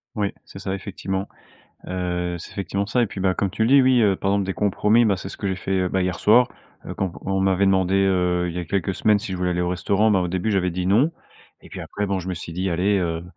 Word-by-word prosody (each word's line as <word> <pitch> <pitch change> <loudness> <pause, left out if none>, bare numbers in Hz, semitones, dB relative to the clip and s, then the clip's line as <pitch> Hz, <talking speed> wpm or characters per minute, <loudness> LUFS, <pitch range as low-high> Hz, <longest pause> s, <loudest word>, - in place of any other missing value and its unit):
Oui, 105 -2 -1
c'est - - -11
ça 95 - -3
effectivement. 95 0 -4 0.6
Heu, 90 -1 -2
c'est - - -10
effectivement 100 +1 -3
ça. 120 +4 +1
Et - - +3
puis, 100 - -8
bah, 95 -1 +2
comme 100 +1 -1
tu 105 - -5
le - - +2
dis 140 +1 +7
oui, 130 -2 +4
heu, 100 -3 +3
par 95 +1 -1
exemple 100 -1 +1
des 95 - -2
compromis, 105 +4 +2
bah, 100 -3 +2
c'est 95 - -7
ce - - -9
que 100 - -3
j'ai 95 - -1
fait, 95 +1 -5
heu, 90 -1 0
bah, 95 - 0
hier 90 -1 -2
soir. 120 +4 +5 0.4
Heu, - - -5
quand 95 -3 -3
on 95 0 -1
m'avait 95 0 +2
demandé, 95 -1 +2
heu, 90 -2 +2
il 85 - -7
y - - -2
a 90 - -4
quelques 95 +2 -1
semaines, 105 +2 +3
si 100 -2 -6
je 95 - -3
voulais 90 0 0
aller 90 0 -1
au 90 - 0
restaurant, 100 +4 +1
bah, 95 - +3
au 90 - -1
début 95 +5 -1
j'avais 90 -3 +1
dit 90 +1 -2
non. 120 - +3 0.5
Et - - -15
puis - - -8
après 105 - -4
bon, 100 -1 -1
je 90 - -7
me 95 - -2
suis 85 -1 -7
dit: 95 +3 -1
«Allez, 95 +4 +1
heu, 85 -2 -2
95 Hz, 285 wpm, -23 LUFS, 90-100 Hz, 0.6 s, dis